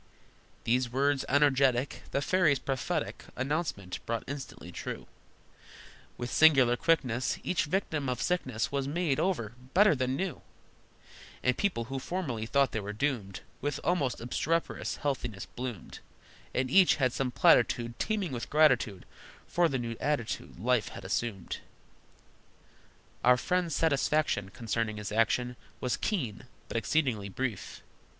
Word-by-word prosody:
These 125 +1 +1
words 140 +2 +1
energetic 135 -2 +3
The 140 - -1
fairy's 175 -6 +3
prophetic 140 +5 -3
Announcement 130 - -2
brought 115 -1 -1
instantly 140 0 -7
true: - - -6 1.1
With 120 0 -4
singular 135 -6 +6
quickness 130 -5 +1
Each 180 - +1
victim 155 -5 -1
of 125 -1 -2
sickness 130 -8 -1
Was 140 -1 -1
made 155 -2 0
over, 120 - 0 0.2
better 205 +1 +7
than 130 -1 0
new, 180 -1 -3 1.0
And 125 -1 +3
people 185 - 0
who 135 +3 -4
formerly 130 -8 -3
thought 140 +2 +3
they 110 - -1
were 105 0 -5
doomed 110 -5 -2 0.2
With 145 0 -2
almost 150 -8 +1
obstreperous 160 +8 -1
healthiness 120 -8 -3
bloomed, 125 -6 -7 0.5
And 130 0 -1
each 190 +1 +6
had 130 -4 +1
some 135 -1 -1
platitude, 120 -1 +3
Teeming 205 -7 -1
with 120 -2 -4
gratitude, 130 - +3 0.4
For 175 -1 +2
the 135 - 0
new 115 -2 -3
attitude 145 -12 -2
life 120 +1 +2
had - - -9
assumed. 100 -2 -2 1.6
Our 125 +1 +6
friend's 180 +3 0
satisfaction 150 -9 +1
Concerning 110 0 -2
his 105 -1 -5
action 115 +3 +1 0.2
Was 125 - 0
keen, 130 - -2 0.2
but - - -2
exceedingly 115 -6 0
brief. 115 -1 -4
130 Hz, 130 wpm, -30 LUFS, 115-150 Hz, 1.6 s, better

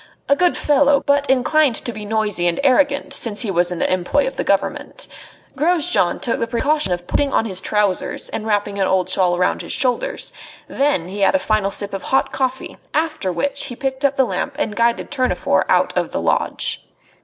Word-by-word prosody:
A 280 - +4
good 355 +3 +2
fellow, 285 -1 +3
but 285 -1 +1
inclined 270 +1 +3
to 240 - -1
be 210 0 -7
noisy 210 -4 0
and 170 - 0
arrogant 280 +1 +2
since 220 -6 +3
he 215 - -1
was 175 -1 +2
in 180 - -4
the 185 - +1
employ 180 - +1
of - - -4
the - - -2
Government. - - -1 0.5
Grosjean 310 - +1
took 235 - -1
the 230 - -1
precaution 275 0 0
of 175 0 -2
putting 280 +8 0
on 225 - +1
his 190 -4 -2
trousers 205 -3 -1
and 220 - -5
wrapping 205 -1 -1
an 190 - +2
old 185 -1 +1
shawl 180 -2 +2
round 180 0 0
his - - -6
shoulders. 275 - -1 0.3
Then 275 - 0
he 195 +3 -7
had 200 +8 +3
a - - +6
final 215 -7 0
sip 200 0 -2
of 195 - -4
hot 265 - +1
coffee; 260 -1 -3 0.2
after 310 - -1
which 280 +11 -2
he 255 -3 -7
picked 265 +2 -3
up 280 -1 +2
the 265 - +4
lamp 275 +3 -3
and 225 -9 -2
guided 235 0 0
Tournefort 255 -3 +1
out - - +2
of - - -1
the - - -2
lodge. - - -1
240 Hz, 205 wpm, -19 LUFS, 195-280 Hz, 0.5 s, a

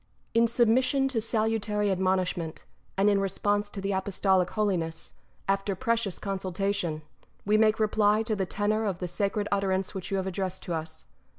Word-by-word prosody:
§ - - -37 0.3
1. 230 - +5
In 235 - +5
submission 255 +4 +3
to 235 -4 0
salutary 215 -2 0
admonishment, 185 -3 -1 0.3
and 195 +1 +3
in 200 -1 +4
response 205 +2 0
to 205 - -7
the 195 +1 -2
Apostolic 190 -1 +1
Holiness, 175 -6 -2 0.3
after 195 0 0
precious 230 -5 0
con 195 -1 -3
sultation, 185 -4 -2 0.4
we 210 +1 +3
make 215 0 +4
reply 215 0 +3
to 220 -1 -1
the 190 -2 -1
tenour 215 +3 0
of 195 -4 -1
the 180 - -4
sacred 200 +3 -1
utterance 195 -1 0
which 185 -2 -5
you 195 - 0
have 190 - -1
addressed 190 0 -3
to 175 - -3
us. 160 0 -5
200 Hz, 180 wpm, -28 LUFS, 185-215 Hz, 0.4 s, 1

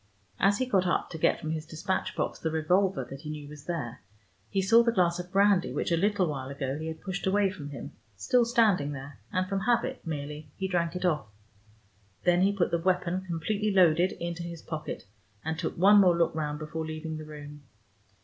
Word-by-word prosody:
As 200 +1 +4
he 255 - 0
got 190 -7 +2
up 175 - 0
to 160 - -6
get - - +3
from 155 - -4
his 160 -1 -3
despatch 185 +4 -2
box - - -2
the 160 - -1
revolver 170 +1 +1
that 135 +2 -9
he 150 - -7
knew 150 -1 -6
was 150 0 -11
there, 145 -9 -4 0.5
he 195 - 0
saw 210 +5 +6
the 235 0 +2
glass 180 -5 +2
of 180 0 -7
brandy 200 -2 +4
which - - -2
a - - +5
little 200 +2 +2
while 135 -4 -4
ago 135 -1 -3
he 160 - -4
had 160 0 -6
pushed 190 -1 -3
away 195 0 +3
from 150 -7 -8
him, 140 -4 -7 0.3
still 240 - +3
standing 215 -11 +3
there, 135 -1 -9
and 185 0 0
from 195 0 -1
habit 240 +5 0
merely 150 -1 -5
he 190 - -1
drank 170 -2 0
it 180 - -2
off. 150 -9 +1 1.0
Then 175 0 +4
he 195 +1 +4
put 200 -3 0
the 170 - +1
weapon, 180 +1 +1
completely 200 +6 -1
loaded, 180 -1 +4
into 170 0 -5
his 170 -1 -7
pocket, 155 -1 -5 0.4
and 160 0 -2
took 170 - -3
one 200 +4 +7
more 180 -3 +5
look 170 - +2
round 150 -1 -2
before 155 +1 -4
leaving 160 0 -5
the 155 - -7
room. 150 -1 -10
170 Hz, 215 wpm, -29 LUFS, 155-190 Hz, 1.0 s, one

